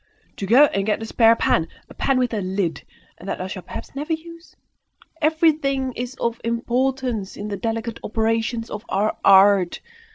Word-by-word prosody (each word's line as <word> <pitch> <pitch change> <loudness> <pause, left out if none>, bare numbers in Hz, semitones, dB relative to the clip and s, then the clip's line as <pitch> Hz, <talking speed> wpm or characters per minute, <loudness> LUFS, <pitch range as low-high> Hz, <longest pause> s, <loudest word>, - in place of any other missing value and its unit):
To 195 - -4
go 250 +7 +7
and 195 -8 -1
get 220 +1 0
a - - -4
spare 225 0 +4
pan! 165 -7 +1 0.2
a - - -13
pan 270 -1 0
with 250 -1 0
a 210 - -1
lid! 185 -2 -2 0.4
and 185 +3 -8
that - - -3
I 185 - -3
shall 185 0 -6
perhaps 175 - -9
never 295 +4 -3
use! 335 +1 -9 0.7
Everything 300 -4 +1
is 245 +2 -5
of 235 -2 -2
importance 240 -2 -1
in 210 +1 -5
the 205 - -3
delicate 225 +1 -3
operations 225 +1 -1
of 210 - -6
our 210 +2 0
art! 195 -2 +5
230 Hz, 175 wpm, -22 LUFS, 205-265 Hz, 0.7 s, go